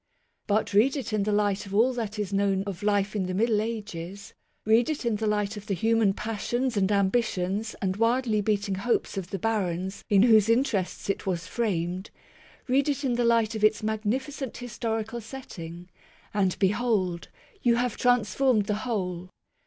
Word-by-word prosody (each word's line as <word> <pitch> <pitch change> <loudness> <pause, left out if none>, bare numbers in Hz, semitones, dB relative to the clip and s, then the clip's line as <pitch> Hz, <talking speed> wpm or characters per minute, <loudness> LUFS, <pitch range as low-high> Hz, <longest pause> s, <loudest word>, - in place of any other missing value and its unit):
But 210 0 +1
read 250 +8 +4
it 250 -4 -4
in 215 - +1
the 210 - 0
light 205 -1 +1
of 195 - -5
all 240 +5 +4
that 225 -3 -4
is 205 -2 -3
known 195 -1 +1
of 200 -2 -6
life 205 0 +1
in 190 -3 -1
the 185 - -3
Middle 215 +1 +2
Ages; 200 -4 -6 0.3
read 225 +4 +4
it 300 -5 -3
in 230 -3 +1
the 220 +1 -1
light 210 0 0
of 210 0 -9
the 200 - 0
human 225 +1 +2
passions 240 +4 -2
and 200 0 +2
ambitions 200 0 0
and 190 0 0
wildly 230 -1 +2
beating 205 -1 0
hopes 210 +5 -1
of 190 -2 -4
the 195 - -3
barons 190 -2 -2
in 200 -1 +5
whose 220 -3 +5
interests 230 -6 0
it 195 - -2
was 175 -3 -1
framed; 185 -3 -2 0.6
read 270 +3 +2
it 285 0 -1
in 260 -3 +1
the 240 0 +1
light 230 -2 +3
of 215 -1 -4
its 215 0 +3
magnificent 235 +5 -2
histori 230 -2 -3
cal 235 +1 -6
setting; 175 -8 -9 0.5
and, 195 -3 +1
behold, 195 -4 0 0.3
you 235 -1 +4
have 245 -1 0
transformed 245 -1 +2
the 210 - 0
whole 185 -7 -3
210 Hz, 180 wpm, -27 LUFS, 195-235 Hz, 0.6 s, in